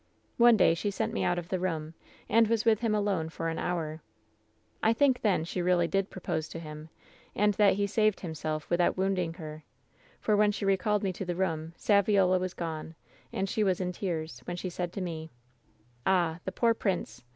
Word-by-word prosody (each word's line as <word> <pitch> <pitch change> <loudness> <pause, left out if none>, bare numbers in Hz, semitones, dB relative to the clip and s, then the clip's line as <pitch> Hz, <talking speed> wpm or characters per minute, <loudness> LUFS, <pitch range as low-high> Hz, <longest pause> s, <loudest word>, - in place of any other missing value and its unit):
"One 235 -1 +7
day 180 - +5
she 185 +5 -2
sent 200 - -2
me - - -1
out 175 - +1
of 175 -1 -5
the 185 - -1
room, 165 -3 -2 0.3
and 230 0 +4
was 225 0 +1
with 220 -2 +4
him 225 -2 +1
alone 195 -6 0
for 165 0 -3
an 165 - -3
hour. 160 -3 -2 0.8
I 220 - +4
think 260 0 +3
then 195 -7 +2
she 175 +2 -3
really 175 -1 +3
did 195 +2 0
pro - - -9
pose 160 -3 -2
to 165 - -6
him, 155 -1 -9 0.5
and 210 0 +3
that 200 -1 +4
he 200 +1 +1
saved 215 0 +1
himself 155 -3 -4
without 175 +1 +2
wound 190 0 +1
ing 165 -2 -2
her, 155 -2 -8 0.6
for 210 - +2
when 210 0 +4
she 205 0 -4
recalled 195 +2 +1
me 190 -2 0
to 185 - -5
the 175 -1 -2
room 165 -3 -2
Saviola 200 -3 +3
was 185 0 -3
gone, 160 -1 -5 0.4
and 195 0 -1
she 215 +3 0
was 190 -3 +1
in 180 -1 -1
tears, 160 - -4
when 175 - -4
she 185 0 -4
said 175 0 -3
to 195 - -4
me: 160 -3 -5 0.4
" 120 +3 -14
^Ah, 175 -3 +2
the - - -2
poor 230 -1 +2
prince 190 - -3
180 Hz, 215 wpm, -29 LUFS, 165-205 Hz, 0.8 s, One